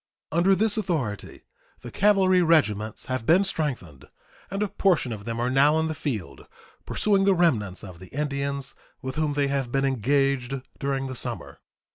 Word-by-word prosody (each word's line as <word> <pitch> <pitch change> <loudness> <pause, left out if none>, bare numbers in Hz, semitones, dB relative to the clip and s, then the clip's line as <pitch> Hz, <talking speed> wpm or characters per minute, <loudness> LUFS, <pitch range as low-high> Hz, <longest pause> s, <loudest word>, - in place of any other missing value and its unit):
Under 180 +4 +4
this 215 +3 +1
authority 135 - -3 0.4
the - - -9
cavalry 190 -2 +4
regiments 110 - +1
have 130 -3 -3
been 175 +10 +4
strengthened, 120 - -3 0.4
and 195 +2 -1
a - - 0
portion 180 -10 +1
of 105 -2 -6
them 115 0 -3
are 125 +2 0
now 145 +4 +4
in 160 - +1
the 160 - -2
field 100 - -5 0.4
pursuing 200 -2 +2
the 195 -1 +4
remnants 115 - +1
of 90 -4 -10
the 95 - -11
Indians 140 -1 -3 0.3
with 130 0 -4
whom 155 0 0
they 145 -1 +1
have 135 -3 -1
been 135 +1 +1
engaged 135 +1 +1 0.2
during 135 -1 -1
the 130 - -5
summer. 120 - -6
140 Hz, 170 wpm, -25 LUFS, 120-170 Hz, 0.4 s, Under